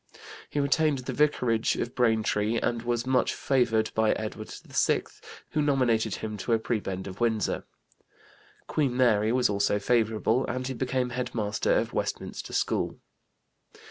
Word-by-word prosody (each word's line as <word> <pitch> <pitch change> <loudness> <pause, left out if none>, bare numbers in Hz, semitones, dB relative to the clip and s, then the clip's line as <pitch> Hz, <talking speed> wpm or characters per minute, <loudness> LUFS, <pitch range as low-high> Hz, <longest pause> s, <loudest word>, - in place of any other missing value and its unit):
He 145 - -2
retained 145 +1 +2
the 130 0 -5
vicarage 120 -5 +2
of 120 - -3
Braintree, 110 -2 +1
and 115 0 -1
was 120 0 -1
much 130 -1 +2
favored 115 -5 +1
by 110 -1 +3
Edward 110 0 -5
VI, - - +1 0.5
who 155 - +1
nominated 120 -7 +2
him 110 -1 -5
to 100 +4 -1
a - - +5
prebend 100 -4 -3
of 95 +3 -8
Windsor. 110 -3 0 1.0
Queen 135 -5 0
Mary 110 -4 +3
was 125 0 +3
also 100 0 +1
favorable 115 +2 +1
and 130 +1 -3
he 130 - -2
became 130 0 -1
head 125 0 -4
master 105 -2 +1
of - - -1
Westminster - - -3
School. - - -1
120 Hz, 145 wpm, -27 LUFS, 110-130 Hz, 1.0 s, a